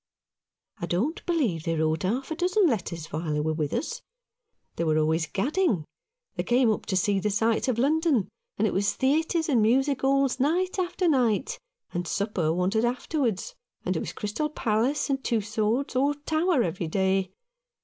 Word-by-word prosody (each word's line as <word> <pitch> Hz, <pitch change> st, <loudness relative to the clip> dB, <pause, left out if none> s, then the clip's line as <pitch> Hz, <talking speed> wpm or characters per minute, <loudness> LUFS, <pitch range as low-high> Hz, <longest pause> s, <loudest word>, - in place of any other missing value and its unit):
"I 170 Hz, -, -3 dB
don't 230 Hz, -, -1 dB
believe 265 Hz, -, +1 dB
they 165 Hz, 0 st, -1 dB
wrote 160 Hz, 0 st, 0 dB
half 245 Hz, -, -2 dB
a -, -, -1 dB
dozen 365 Hz, +4 st, +2 dB
letters 190 Hz, -, -1 dB
while 155 Hz, 0 st, -2 dB
they 150 Hz, -, 0 dB
were 155 Hz, +1 st, 0 dB
with 155 Hz, -2 st, -2 dB
us. -, -, -3 dB, 0.7 s
They -, -, -1 dB
were 155 Hz, -1 st, +2 dB
always 160 Hz, +1 st, +1 dB
gadding. 250 Hz, -, 0 dB, 0.5 s
They -, -, -2 dB
came 240 Hz, -1 st, +3 dB
up 215 Hz, -, -3 dB
to 190 Hz, -, -1 dB
see 195 Hz, +2 st, +2 dB
the 210 Hz, -, 0 dB
sights 225 Hz, +4 st, +1 dB
of 250 Hz, -3 st, +1 dB
London, 285 Hz, -, +2 dB, 0.3 s
and 215 Hz, -, +2 dB
it 210 Hz, -, 0 dB
was 200 Hz, +2 st, +1 dB
theatres 320 Hz, +4 st, +1 dB
and 255 Hz, -7 st, +3 dB
music 265 Hz, +5 st, +2 dB
'alls 270 Hz, -1 st, +2 dB
night 360 Hz, +8 st, +1 dB
after 360 Hz, 0 st, 0 dB
night, 270 Hz, -, +1 dB, 0.3 s
and 175 Hz, 0 st, -2 dB
supper 195 Hz, -4 st, 0 dB
wanted 185 Hz, +6 st, +1 dB
after 250 Hz, +6 st, -1 dB
wards; 240 Hz, -, -1 dB, 0.3 s
and -, -, 0 dB
it -, -, 0 dB
was -, -, -4 dB
Crystal 220 Hz, +9 st, -2 dB
Palace 245 Hz, +1 st, 0 dB
and 270 Hz, -1 st, -1 dB
Tussauds 220 Hz, +3 st, -1 dB
or 280 Hz, +3 st, +2 dB
Tower 315 Hz, 0 st, +1 dB
every 170 Hz, -1 st, -3 dB
day. 190 Hz, +2 st, +1 dB
230 Hz, 180 wpm, -26 LUFS, 190-290 Hz, 0.7 s, came